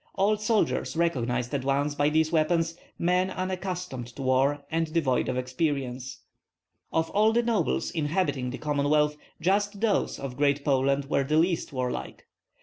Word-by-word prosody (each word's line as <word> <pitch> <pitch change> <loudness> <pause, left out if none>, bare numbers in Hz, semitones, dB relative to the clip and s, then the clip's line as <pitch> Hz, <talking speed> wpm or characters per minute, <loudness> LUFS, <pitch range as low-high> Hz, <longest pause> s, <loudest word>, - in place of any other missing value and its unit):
Old 205 +2 +2
soldiers 215 -5 +1
recognized 125 -7 0
at 140 -2 -1
once 140 +2 +1
by 145 0 +2
these 155 +1 +2
weapons 165 +1 +1 0.2
men 180 +2 +2
unaccustomed 180 -8 -4
to 125 +3 -8
war 135 +2 +2
and 165 -1 0
devoid 145 -8 +1
of 130 - -1
experience. 130 -1 -2 0.7
Of 160 0 0
all 215 +2 +4
the 235 +1 +3
nobles 225 -8 0
inhabiting 150 -5 -1
the 130 - -5
Commonwealth 150 0 +1 0.2
just 200 +4 +1
those 215 -2 +1
of 135 -2 -6
Great 140 0 +1
Poland 140 0 +2
were 140 0 +1
the 150 +3 +1
least 170 +1 +1
warlike. 130 -2 -4
150 Hz, 150 wpm, -27 LUFS, 135-180 Hz, 0.7 s, all